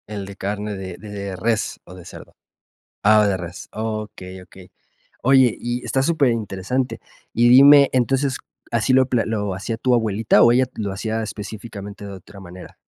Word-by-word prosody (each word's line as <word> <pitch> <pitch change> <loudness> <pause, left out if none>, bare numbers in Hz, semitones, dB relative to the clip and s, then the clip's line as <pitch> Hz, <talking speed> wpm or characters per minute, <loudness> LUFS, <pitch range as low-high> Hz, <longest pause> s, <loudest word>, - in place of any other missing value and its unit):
El 105 -2 -6
de 100 0 -10
carne 105 +1 -4
de 95 -2 -7
de 100 -2 -7
res, 110 +2 -2
¿o 90 - -13
de 90 -2 -12
cerdo? - - -13 0.7
Ah, 105 0 +5
de 95 -2 0
res. 85 -1 -8
Okey, 105 -4 -6
okey. 90 0 -16 0.5
Oye, 130 -3 +4
y 120 +1 -4
está 135 - 0
superinteresante. 125 - -1 0.3
Y 120 +1 +4
dime, 140 +2 +8
entonces, 130 +1 +1 0.3
¿así 115 +2 +1
lo 130 0 +5
pla 125 -3 0
lo 105 -3 -2
hacía 100 +5 -4
tu 125 +1 +1
abuelita 110 -2 +2
o 120 - +6
ella 130 +2 +3
lo 105 -3 -3
hacía 110 +3 -3
específicamente 105 -1 -8
de 100 - -8
otra 95 +1 -13
manera? 90 -1 -12
110 Hz, 165 wpm, -21 LUFS, 100-120 Hz, 0.7 s, dime